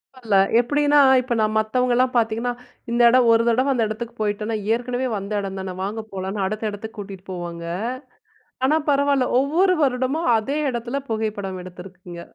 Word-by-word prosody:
பரவால்ல. 225 -6 0 0.2
எப்படின்னா, 290 +4 +2 0.2
இப்போ 250 -1 -3
நான் 215 0 +1
மத்தவங்கள்லாம் 250 +3 +1
பாத்தீங்கன்னா, 230 +1 0 0.4
இந்த 235 +1 +2
எடம் 245 -1 +4
ஒரு 230 0 +4
தடவ 255 +4 +2
அந்த 235 -3 +1
எடத்துக்கு 230 +2 -6
போயிட்டோம்னா, 215 +1 -1 0.2
ஏற்கனவே 245 +2 -2
வந்த 200 +1 -7
எடம் 195 -1 -5
தானே! 190 -1 -5
வாங்க 215 +3 -4
போலாம்ன்னு, 195 +1 -3
அடுத்த 215 +2 -2
எடத்துக்கு 220 +2 -9
கூட்டிட்டு 195 -2 -8
போவாங்க. 170 -2 -6 1.0
ஆனா 305 +4 +3
பரவால்ல, 280 -2 +2
ஒவ்வொரு 335 +8 +3
வருடமும் 260 +4 0
அதே 270 +7 -3
எடத்துல 240 +3 -3
புகைப்படம் 205 -4 -3
எடுத்திருக்கீங்க. 180 -1 -11
225 Hz, 150 wpm, -22 LUFS, 200-255 Hz, 1.0 s, எடம்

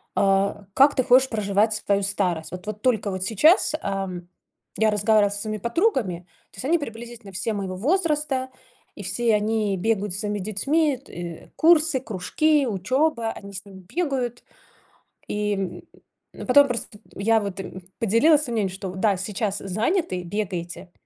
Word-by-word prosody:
а, 195 +1 +2
как 280 +5 +5
ты 255 - +2
хочешь 260 +2 +5
проживать 210 0 +1
свою 200 -1 0
старость. 190 -5 -1
Вот 180 +2 -8
вот 215 0 -6
только 220 -5 +1
вот 185 -1 -3
сейчас, 300 - +4
ам, 190 -3 -4 0.5
я 220 0 +3
разговаривала 210 0 +3
со 205 - -4
своими 215 0 -3
подругами, 235 - 0 0.3
то - - -18
есть 195 - -6
они 335 +4 +3
приблизительно 235 -4 -8
все 190 +4 -2
моего 195 -2 -4
возраста, 295 - 0 0.5
и 205 - -8
все 225 +4 +1
они 210 -1 0
бегают 205 0 0
со 195 - -4
своими 210 0 -2
детьми: 275 - +1
тэ 175 - -9
курсы, 320 -3 +4
кружки, 265 - +1
учеба. 235 - 0
Они 200 -2 -10
с 195 +2 -7
ними 190 -1 -12
бегают. 265 -8 -1 0.9
И, 210 0 -1 0.8
м, - - -9
потом 285 +3 +7
просто 235 -4 -5 0.2
я 225 +3 +2
вот 200 -2 -5
им 190 -1 -7 0.2
поделилась 245 +8 +4
своим 245 -5 -4
мнением, 195 -4 -1
что 190 -1 -5
да, 200 0 +2
сейчас 200 +1 -2
заняты, 215 - -1
бегаете 180 -2 -4
215 Hz, 155 wpm, -24 LUFS, 195-255 Hz, 0.9 s, потом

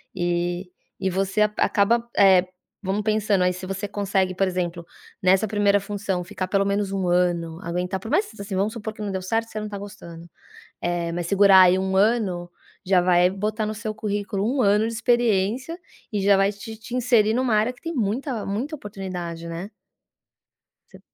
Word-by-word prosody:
e 175 +1 -1 0.3
e 190 - +1
você 195 +3 -1
acaba, 210 +2 +2
eh, 190 -2 +6 0.4
vamos 195 +2 -1
pensando 215 -3 +1
aí, 180 - +2
se 185 +1 -7
você 195 +2 -4
consegue, 195 -2 -1
por 195 - +2
exemplo, 175 -2 -3 0.4
nessa 190 +3 +4
primeira 205 -1 +2
função, 195 -2 -3
ficar 185 0 -4
pelo 195 0 +2
menos 200 0 0
1 190 -2 -1
ano, 175 -2 +1
aguentar, 180 +2 -3
por 225 +6 -7
mais 400 +7 +2
assim, 200 0 -7
vamos 200 +4 0
supor 220 -2 -6
que 215 - -11
não 205 - -3
deu 190 -1 -3
certo, 225 +5 -1
você 215 -1 -6
não 215 - -5
tá 205 - -5
gostando, 170 -5 -10 0.5
eh, 170 -1 -2
mas 175 0 -3
segurar 195 0 +6
aí 185 0 +5
1 190 0 0
ano, 195 -5 +1 0.3
já 185 -1 +3
vai 180 0 +4
botar 210 +3 -2
no 215 - -3
seu 215 0 -5
currículo 205 +2 -2
1 260 - +2
ano 210 +2 +3
de 230 - -5
experiência 235 - +1 0.3
e 205 -3 -1
já 200 0 +5
vai 195 +1 +3
te 210 +2 -9
te 225 +2 -9
inserir 225 -3 +3
numa 250 -2 +1
área 220 +4 +2
que - - -23
tem 335 0 -4
muita 235 +1 -2
muita 240 +11 -3
oportunidade, 185 - -6
né. 170 +5 -6 1.2
Você - - -14
200 Hz, 185 wpm, -23 LUFS, 185-215 Hz, 1.2 s, eh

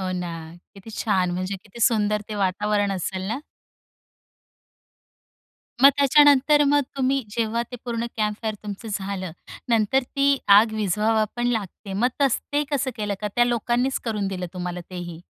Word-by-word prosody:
हो 185 -1 -2
ना 175 -1 -4 0.4
किती 200 +3 -12
छान! 185 -4 +1
म्हणजे 185 +2 -3
किती 225 +2 -13
सुंदर 210 -3 +1
ते 215 - -5
वातावरण 205 +1 0
असेल 185 0 -3
ना? - - -2 2.4
मग 275 - +10
त्याच्यानंतर 290 +1 +5
मग 290 0 +4 0.2
तुम्ही 270 +1 +1
जेव्हा 230 +1 -1
ते 245 - -6
पूर्ण 235 -1 -2
कॅम्पफायर 215 0 -1
तुमचं 210 +2 -7
झालं. 190 -3 -4 0.4
नंतर 230 +3 +2
ती 275 +2 +1 0.2
आग 220 +1 +3
विझवावा 215 +2 +1
पण 240 0 0
लागते. 205 -3 -3
मग 230 +6 +2
तस 275 -4 +3
ते 295 +1 +2
कसं 275 -2 0
केलं 210 -2 -2
का, 210 - -2
त्या 240 - +5
लोकांनीच 240 +2 0
करून 210 -4 -1
दिलं 185 -2 -4
तुम्हाला 180 0 -4
तेही? 175 -2 -7
215 Hz, 155 wpm, -23 LUFS, 195-245 Hz, 2.4 s, मग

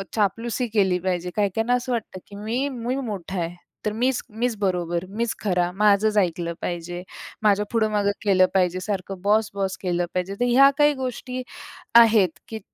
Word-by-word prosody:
चापलुसी 230 +4 0
केली 190 -4 +3
पाहिजे. 180 -1 -2
काही-काहीना 220 +4 +1
असं 250 +1 -1
वाटतं 220 -5 -3
की 200 - -12
मी, 230 +7 -2
मी 250 0 -3
मोठा 200 -8 -4
आहे, 170 +1 -3 0.3
तर 210 - +1
मीच, 250 +3 0
मीच 230 +2 -1
बरोबर, 175 -2 -1
मीच 225 +3 -2
खरा, 180 -3 +1
माझंच 210 +2 +3
ऐकलं 170 -3 0
पाहिजे, 175 +1 -4 0.4
माझ्या 210 0 +3
पुढं-मागं 215 -3 +1
केलं 185 -2 +5
पाहिजे, 185 -1 +2
सारखं 190 -1 -4
बॉस-बॉस 200 -2 +1
केलं 175 -1 0
पाहिजे. 185 +2 -2
तर 245 - +2
ह्या 275 +3 +7
काही 295 0 +5
गोष्टी 255 +1 -4 0.5
आहेत 215 -8 +6
की 220 -1 -6
205 Hz, 160 wpm, -24 LUFS, 180-230 Hz, 0.5 s, ह्या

